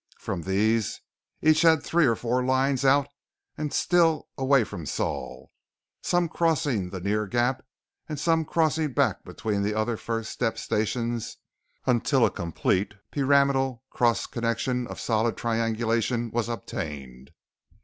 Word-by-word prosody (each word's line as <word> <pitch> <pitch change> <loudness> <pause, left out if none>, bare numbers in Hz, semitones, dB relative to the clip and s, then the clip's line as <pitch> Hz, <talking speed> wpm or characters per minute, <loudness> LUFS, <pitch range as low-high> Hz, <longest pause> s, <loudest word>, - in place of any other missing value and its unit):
From 85 - -4
these, 105 +4 +1 0.4
each 155 0 +5
had 160 -3 +5
three 170 -3 +3
or 115 - +3
four 125 +3 -1
lines 130 +1 +1
out 140 +1 +4 0.5
and 150 -1 -3
still 165 -3 +2
away 135 -1 +3
from 85 -7 -7
Sol, 65 0 -4 0.5
some 175 -1 +1
crossing 145 - 0
the 95 - -6
near 105 +3 -1
gap 120 +4 0 0.5
and 150 -2 -4
some 165 +1 +2
crossing 155 -2 0
back - - +1
between 105 -2 -3
the 105 +1 -1
other 110 +1 0
first 115 0 -4
step 115 -2 -1
stations 115 +2 -2 0.5
until 125 +1 +3
a - - +1
complete 90 +4 -1 0.2
pyramidal 135 -3 +2
cross 120 -1 +2
connection 120 +1 -2
of - - -8
solid 115 0 0
triangulation 115 +1 0
was 120 0 -1
obtained. 70 - -6
120 Hz, 135 wpm, -26 LUFS, 110-140 Hz, 0.5 s, each